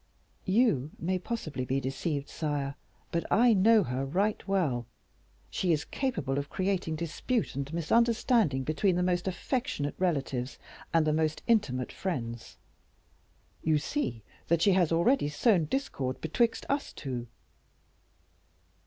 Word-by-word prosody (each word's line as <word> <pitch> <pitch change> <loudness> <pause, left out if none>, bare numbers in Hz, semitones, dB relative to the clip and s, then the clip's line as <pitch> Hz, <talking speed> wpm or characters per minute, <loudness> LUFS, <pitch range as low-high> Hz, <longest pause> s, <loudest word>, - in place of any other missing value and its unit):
"You 190 - +3
may 185 +2 -1
possibly 175 - -4
be 130 +2 0
deceived, 140 +2 -2
sire, 145 -3 -2 0.4
but 170 - 0
I 240 +1 +6
know 215 +2 +5
her 130 -2 -2
right 195 +12 0
well; 150 - 0 0.6
she 180 - 0
is 150 -2 +1
capable 170 - -1
of 140 - -5
creating 185 -4 -1
dispute 170 +9 -2
and 140 +1 -4
misunderstanding 220 - +2
between 175 +6 +1
the 180 - +1
most 180 0 0
affectionate 190 - -2
relatives 140 -7 -1 0.3
and 165 -2 +3
the 155 - +2
most 155 0 0
intimate 130 - +1
friends. 120 -11 -4 1.0
You 155 -1 +3
see 150 - -2 0.2
that 170 0 +2
she 200 - +5
has 180 -4 +3
already 170 - +3
sown 170 +3 +3
discord 140 - -2
betwixt 225 +9 0
us 280 +1 -1
two." 125 -4 -5
165 Hz, 130 wpm, -29 LUFS, 140-205 Hz, 1.0 s, I